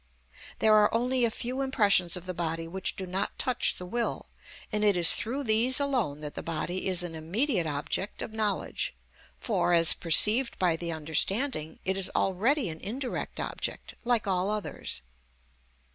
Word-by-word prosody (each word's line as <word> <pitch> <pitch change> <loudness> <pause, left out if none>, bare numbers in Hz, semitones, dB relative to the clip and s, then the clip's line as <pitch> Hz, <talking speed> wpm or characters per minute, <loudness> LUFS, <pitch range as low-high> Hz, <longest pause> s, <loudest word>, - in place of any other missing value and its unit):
There 220 -1 +4
are 210 -1 +5
only 245 +2 +2
a - - +1
few 250 +4 -3
impressions 200 -10 +2
of 180 - -10
the 185 - -4
body 165 -1 -3
which 190 +3 -2
do 190 - -5
not 190 +3 -3
touch 255 -2 +1
the 180 - -6
will, 235 +5 -3 0.4
and 210 -1 0
it 205 -3 +3
is 170 -1 +8
through 265 +6 -2
these 235 +3 +4
alone 250 - -1
that 150 -1 -6
the - - -6
body 170 +3 -3
is 185 -2 +1
an 175 -2 -6
immediate 180 - -1
object 150 +7 -3
of 220 - -8
knowledge, 215 -2 -2 0.4
for, 185 -6 0
as 165 -1 +6
perceived 215 +9 +4
by 175 -3 +2
the 170 +1 -4
understanding, 160 - -1
it 190 0 0
is 190 -1 +1
already 225 +7 +1
an 160 -1 -6
indirect 250 - -5
object - - -5
like 240 -2 +1
all 190 0 0
others. 210 - -4
195 Hz, 170 wpm, -28 LUFS, 170-235 Hz, 0.4 s, is